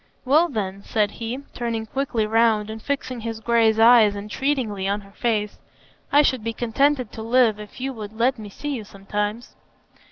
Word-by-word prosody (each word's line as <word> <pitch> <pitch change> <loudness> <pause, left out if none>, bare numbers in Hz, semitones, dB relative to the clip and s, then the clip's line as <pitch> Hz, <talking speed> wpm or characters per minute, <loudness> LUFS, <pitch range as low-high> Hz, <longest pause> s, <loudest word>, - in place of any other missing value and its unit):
"Well, 310 +6 +4
then," 200 -5 -4
said 210 -1 0
he, 235 +5 -5
turning 230 -2 -3
quickly 240 -2 -1
round 220 -1 +2
and 220 0 -8
fixing 265 -2 -3
his 225 -1 -5
gray 230 -1 +3
eyes 225 -2 +6
entreatingly 210 -1 -2
on 200 +1 -1
her 200 0 -17
face, 210 -1 -1 0.5
"I 290 +1 +6
should 260 -6 +1
be 230 0 -2
contented 250 +1 +1
to 220 - -8
live, 230 -2 +3
if 210 +2 -11
you 265 +1 -3
would 215 -3 -8
let 250 +1 +2
me 210 -1 -8
see 295 +9 -6
you 235 -5 -4
sometimes." 205 +3 -4
225 Hz, 180 wpm, -23 LUFS, 210-250 Hz, 0.5 s, eyes